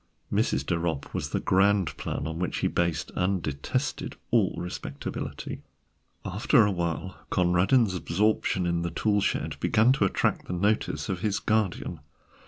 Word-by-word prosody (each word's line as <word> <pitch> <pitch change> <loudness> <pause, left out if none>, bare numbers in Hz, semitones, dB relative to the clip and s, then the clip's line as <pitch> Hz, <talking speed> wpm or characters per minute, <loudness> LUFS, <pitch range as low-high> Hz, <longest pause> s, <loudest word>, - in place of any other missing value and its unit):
Mrs. 65 +1 +1
de 85 +2 0
Ropp 80 -5 -3
was - - -2
the - - -1
ground 95 -3 +2
plan - - -4
on 80 +1 -4
which 90 - -1
he - - +3
based 85 -2 -1
and 95 +1 +1
detested 70 -4 -3 0.2
all - - +3
respectability. 90 - -5 0.6
After - - +3
a 105 - +1
while 85 +1 -3
Conradin's 95 +5 +3
absorption 95 +1 +1
in 85 -1 0
the 85 - -1
tool 105 +3 +1
shed - - -1
began 110 +3 +4
to 130 -7 +3
attract 95 - 0
the - - -3
notice 100 +5 0
of 95 -4 -2
his 105 +1 0
guardian. 100 -6 0
90 Hz, 155 wpm, -27 LUFS, 85-105 Hz, 0.6 s, began